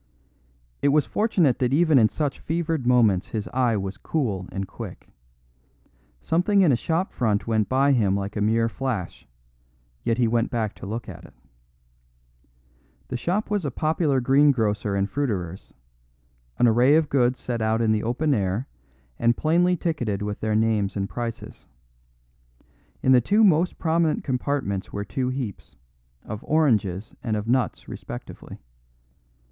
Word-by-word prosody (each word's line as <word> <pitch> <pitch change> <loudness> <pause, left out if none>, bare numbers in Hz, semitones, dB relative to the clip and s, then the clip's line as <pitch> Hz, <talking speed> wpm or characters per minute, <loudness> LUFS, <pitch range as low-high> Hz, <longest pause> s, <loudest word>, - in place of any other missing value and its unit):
It - - +2
was 145 +1 +3
fortunate 180 - +1
that 125 -1 +1
even 155 -2 +4
in 110 -2 +4
such 145 -3 -3
fevered 160 -5 -2
moments 110 -7 +3
his 110 -2 -4
eye 125 -4 +1
was 95 0 -4
cool 105 - -2
and 95 0 -4
quick. 95 - -9 1.1
Something 190 +5 +2
in 165 - +4
a - - +4
shop 165 +9 -1
front 110 -4 0
went 110 -2 0
by 135 +2 +3
him 105 -7 +2
like 100 0 -4
a 105 - -2
mere 115 +2 +2
flash; 115 -7 -4 0.8
yet 115 - 0
he 120 -2 +2
went 115 +1 +1
back 110 -3 -2
to - - -8
look 115 +4 -5
at - - -10
it. - - -17 1.7
The - - -3
shop 190 - -2
was 205 -3 0
a 145 - -1
popular 155 0 0
greengrocer 120 -7 +2
and 100 0 0
fruiterer's, 100 -10 -3 0.9
an 120 - +4
array 120 +6 +5
of 160 -1 +3
goods 125 -3 +1
set 120 -2 -3
out 110 +1 +1
in 115 -2 +2
the 110 -1 +1
open 135 +7 0
air 100 +3 -1 0.5
and 120 0 +2
plainly 175 +3 +2
ticketed 120 - -2
with 105 0 -4
their 110 -1 -1
names 110 -3 +1
and 100 0 -1
prices. 115 0 -7 1.4
In 130 - +4
the 125 -1 +6
two 210 - +3
most 175 -3 +3
prominent 165 -1 +1
compartments 125 -7 -2
were 100 0 -4
two 125 +6 -2
heaps, 130 -6 -6 0.5
of 110 +1 -7
oranges 110 - +1
and 110 -2 -1
of 105 +1 -5
nuts 125 +1 0
respectively. - - -9
120 Hz, 155 wpm, -24 LUFS, 105-145 Hz, 1.7 s, the